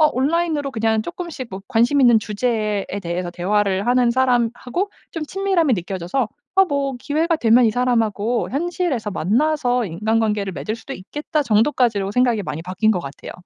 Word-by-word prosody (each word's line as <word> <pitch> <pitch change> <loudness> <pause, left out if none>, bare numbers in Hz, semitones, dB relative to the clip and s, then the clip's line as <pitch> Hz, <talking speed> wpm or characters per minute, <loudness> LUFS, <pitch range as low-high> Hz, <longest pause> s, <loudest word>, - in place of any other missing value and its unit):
어 310 - +7
온라인으로 295 +1 0
그냥 220 -2 0
쪼끔씩 335 -5 -6
뭐 190 +1 -6
관심 240 +6 +3
있는 240 -4 +6
주제에 210 -1 -1 0.2
대해서 175 0 -3
대화를 195 +3 0
하는 245 -1 +4
사람하고 250 - 0 0.2
좀 325 -2 -4
친밀함이 365 - +1
느껴져서 190 +6 -2 0.3
'어. 385 - +7
뭐 280 -2 -1
기회가 320 +6 0
되면 240 -1 +4
이 - - +3
사람하고 235 -2 0
현실에서 305 - -1
만나서 245 - +1
인간관계를 210 +2 0
맺을 215 +5 -4
수도 230 +4 -9
있겠다.' 295 - -3
정도까지로 220 -4 +1
생각이 245 -4 +2
많이 160 -2 -5
바뀐 190 +5 +1
것 180 - -1
같아요. 140 -3 -8
235 Hz, 390 characters per minute, -21 LUFS, 210-280 Hz, 0.3 s, 어